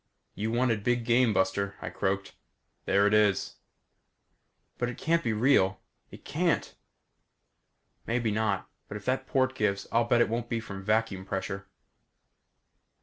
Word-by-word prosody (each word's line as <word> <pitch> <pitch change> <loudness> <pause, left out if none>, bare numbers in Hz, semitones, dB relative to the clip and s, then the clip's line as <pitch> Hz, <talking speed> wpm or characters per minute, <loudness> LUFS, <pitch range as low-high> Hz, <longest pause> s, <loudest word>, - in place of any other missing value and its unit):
"You 110 +3 -2
wanted 120 -3 +1
big 120 0 +1
game, 120 0 +4
buster," 100 +1 0
I - - -6
croaked. 95 0 -2 0.5
"There 100 +1 +3
it 105 - +3
is." 105 -2 +2 1.2
"But 120 - 0
it 125 - -7
can't 165 +1 +1
be 115 - 0
real. 105 -5 +3 0.3
It - - -14
can't!" - - 0 1.3
"Maybe 115 -1 0
not, 105 -2 0 0.2
but 105 - -6
if 105 - -12
that 130 +1 -1
port 130 -1 +1
gives 100 -5 0
I'll 115 0 +3
bet 120 0 +3
it - - +4
won't 120 +1 -3
be 115 - -1
from 95 -3 -8
vacuum 105 -2 0
pressure." 95 0 -4
110 Hz, 145 wpm, -29 LUFS, 100-120 Hz, 1.3 s, game